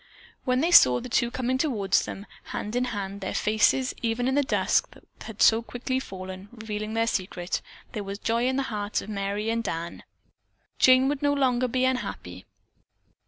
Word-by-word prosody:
When 255 0 +2
they 335 +3 +1
saw 125 - +8
the - - -8
two 235 0 +2
coming 255 +1 -1
toward 210 -11 -2
them, 200 - +1 0.2
hand 210 +3 -5
in 250 0 +1
hand, 200 -4 -5
their 190 - -4
faces, 220 +5 +2
even 235 +1 0
in 265 - +1
the 285 - +3
dusk, 275 - +1
that - - -18 0.2
had 220 -2 -1
so 225 +1 +6
quickly 250 +2 -3
fallen, 190 -3 -8
revealing 220 -2 -5
their 225 0 +2
secret, 185 -5 -2 0.3
there 210 - -4
was 200 0 -5
joy 230 +3 0
in 260 - 0
the 275 - 0
hearts 205 0 -2
of - - -10
Merry 205 +1 -2
and 230 0 -1
Dan. 165 -2 -4 0.8
Jane 255 +1 +6
would 285 0 -1
no 285 0 +2
longer 255 -3 +2
be 255 +1 +1
unhappy. 95 - -3
225 Hz, 185 wpm, -26 LUFS, 200-255 Hz, 0.8 s, saw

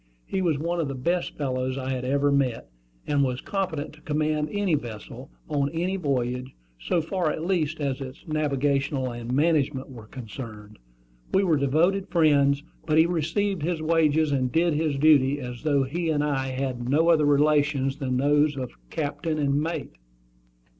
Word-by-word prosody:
He 190 - -2
was 165 -5 +1
one 170 +4 -2
of 160 - 0
the 135 - -4
best 170 +8 -1
fellows 130 -2 -2
I 130 0 -3
had 130 -1 -2
ever 140 +2 +2
met, 135 - 0 0.4
and 145 -1 +2
was 125 -1 -1
competent 160 -7 -3
to 155 - -17
command 150 0 0
any 205 -4 0
vessel, 120 -7 -5 0.2
on 140 -1 0
any 175 +4 -1
voyage, 130 -6 -2 0.2
so 110 - 0
far 170 0 -1
at 155 +2 -3
least 160 -4 0
as 140 -2 -2
its 130 +3 -9
navigation 145 -2 0
and 120 -2 -4
management 145 -2 +1
were 115 -4 -11
concerned. 110 -3 -9 0.6
We 195 - +4
were 170 -5 +3
devoted 160 +8 +2
friends; 145 -4 +3 0.2
but 155 -1 +1
he 160 - +7
received 175 +3 -1
his 165 +2 -1
wages 155 -1 +2
and 130 -3 0
did 165 0 +2
his 150 -1 0
duty 145 -1 +4
as 125 -2 -7
though 145 -3 +2
he 165 +5 -2
and 150 -2 +1
I 135 -3 0
had 130 -1 -2
had 120 0 -5
no 160 +5 +3
other 155 -3 +4
relations 145 -2 +2
than 130 -3 -1
those 145 +2 +3
of 130 -2 -4 0.2
captain 155 - -2
and 140 -1 +1
mate. 160 -2 -3
145 Hz, 175 wpm, -26 LUFS, 135-160 Hz, 0.6 s, he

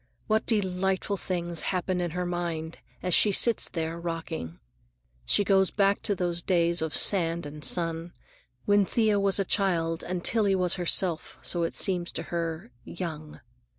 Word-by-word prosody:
What 220 0 0
delightful 190 -2 0
things 175 -3 -3
happen 185 -1 -1
in 175 - -1
her 180 +2 -3
mind 170 -2 -4 0.2
as 180 - 0
she 210 - +5
sits 230 +3 +3
there 165 0 -3
rocking! 165 - -5 0.7
She - - +4
goes 190 -1 +3
back 200 -1 +1
to 205 - 0
those 175 -2 -1
early - - -31
days 170 -2 +2
of 160 -4 -2
sand 170 -4 +2
and 150 +1 -8
sun, 165 0 +2 0.5
when 205 0 +4
Thea 215 0 +1
was 195 -1 +3
a 195 - 0
child 170 -5 0
and 180 -1 -4
Tillie 210 -4 +2
was 180 -2 +1
herself, 175 -1 0
so 175 - +1
it 165 - -2
seems 180 -3 0
to - - -4
her, 165 -5 -3
"young." 155 -4 -7
175 Hz, 165 wpm, -27 LUFS, 165-195 Hz, 0.7 s, she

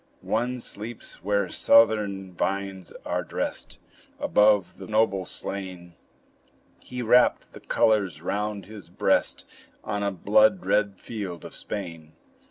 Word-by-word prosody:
One 125 0 -1
sleeps 110 -6 -7
where 100 0 +1
southern 105 -4 +3
vines 95 0 -3
are - - -1
dressed - - -4 0.4
Above 105 -3 +3
the 95 - -8
noble 105 -3 +2
slain; 90 -3 -6 0.9
He 125 -1 -6
wrapped 120 +2 +3
the - - -10
colors 100 -8 +1
round 100 +3 -3
his 105 -2 -11
breast - - +1 0.4
On 105 -1 -3
a 100 - +1
blood 190 - +3
red 100 -2 +1
field 100 -7 -6
of - - -9
Spain. 85 -6 -6
100 Hz, 120 wpm, -26 LUFS, 95-110 Hz, 0.9 s, southern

